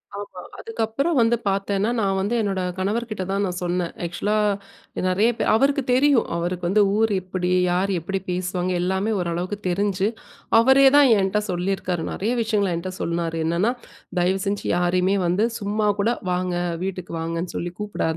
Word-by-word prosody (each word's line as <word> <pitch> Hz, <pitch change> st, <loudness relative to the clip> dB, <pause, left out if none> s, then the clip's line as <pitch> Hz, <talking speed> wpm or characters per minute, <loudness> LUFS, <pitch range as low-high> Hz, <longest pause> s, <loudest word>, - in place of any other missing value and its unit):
ஆமா. 205 Hz, 0 st, -7 dB, 0.2 s
அதுக்கப்புறம் 280 Hz, -, -1 dB
வந்து 230 Hz, +1 st, +4 dB
பார்த்தேன்னா, 195 Hz, +2 st, 0 dB
நான் 195 Hz, -2 st, +1 dB
வந்து 205 Hz, +5 st, 0 dB
என்னோட 195 Hz, -3 st, -1 dB, 0.2 s
கணவர்க்கிட்ட 215 Hz, +1 st, -2 dB
தான் 200 Hz, +1 st, 0 dB
நான் 180 Hz, -2 st, -3 dB
சொன்னேன். 175 Hz, -1 st, -1 dB
ஆக்ஷூலா 205 Hz, +5 st, -1 dB, 0.6 s
அ -, -, -1 dB
நிறைய 195 Hz, +5 st, +3 dB
பே -, -, 0 dB
அவருக்கு 275 Hz, +4 st, +2 dB
தெரியும். 270 Hz, -1 st, +4 dB
அவருக்கு 175 Hz, +1 st, -2 dB
வந்து, 205 Hz, +4 st, +3 dB, 0.2 s
ஊர் 225 Hz, 0 st, +2 dB
எப்பிடி? 180 Hz, -1 st, -2 dB, 0.2 s
யார் 185 Hz, +3 st, +1 dB
எப்பிடி 195 Hz, +4 st, -3 dB
பேசுவாங்க? 180 Hz, 0 st, -1 dB
எல்லாமே 190 Hz, +4 st, 0 dB
ஓரளவுக்கு 175 Hz, +3 st, -2 dB
தெரிஞ்சு 195 Hz, +1 st, 0 dB, 0.5 s
அவரேதான் 270 Hz, +3 st, +6 dB
என்ட்ட 195 Hz, +2 st, +1 dB
சொல்லிருக்காரு. 180 Hz, -1 st, -1 dB
நிறைய 215 Hz, +4 st, -1 dB
விஷயங்கள் 210 Hz, -5 st, +1 dB
என்ட்ட 175 Hz, +3 st, -4 dB
சொன்னாரு. 170 Hz, -1 st, -2 dB
என்னன்னா, 170 Hz, +8 st, +1 dB, 0.5 s
தயவுசெஞ்சு 190 Hz, +3 st, 0 dB
யாரையுமே 180 Hz, +2 st, +2 dB
வந்து 180 Hz, +5 st, +2 dB, 0.2 s
சும்மாகூட 205 Hz, 0 st, 0 dB, 0.2 s
வாங்க, 180 Hz, 0 st, -1 dB, 0.3 s
வீட்டுக்கு 185 Hz, -2 st, -5 dB
வாங்கன்னு 165 Hz, +2 st, -3 dB
சொல்லி 175 Hz, -, -3 dB
கூப்பிடாத! 205 Hz, -6 st, -2 dB
195 Hz, 145 wpm, -23 LUFS, 180-215 Hz, 0.6 s, அவரேதான்